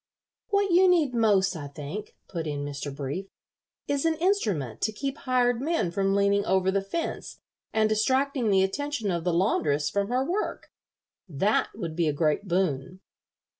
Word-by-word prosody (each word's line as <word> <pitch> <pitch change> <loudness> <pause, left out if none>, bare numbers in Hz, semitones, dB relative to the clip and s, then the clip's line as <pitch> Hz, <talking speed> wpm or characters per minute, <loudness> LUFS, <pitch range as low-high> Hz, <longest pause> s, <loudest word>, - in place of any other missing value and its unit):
"What 400 -1 +2
you 365 +2 +6
need 325 -8 +3
most, 200 -5 +3
I 145 -3 -6
think," 150 +8 -7
put 165 -4 -4
in 145 -1 -3
Mr. 145 0 -5
Brief, 145 +8 -4 0.6
"is 285 -1 0
an 325 -1 +2
instrument 210 - 0
to 220 - +1
keep 275 +5 -4
hired 245 -3 +1
men 310 - 0
from 195 +2 +1
leaning 200 0 +3
over 190 0 +2
the 195 0 +1
fence 260 +13 -4 0.3
and 220 -1 +3
distracting 260 +3 +1
the 190 -1 +4
attention 235 +1 -2
of 170 -2 -2
the 180 - +1
laundress 150 -5 +1
from 200 +3 0
her 250 +3 0
work. 370 +7 -3 0.6
That 190 +8 +1
would 170 -7 -5
be 170 -1 +1
a 150 - +1
great 155 +6 0
boon." 180 -1 -1
200 Hz, 170 wpm, -27 LUFS, 165-260 Hz, 0.6 s, you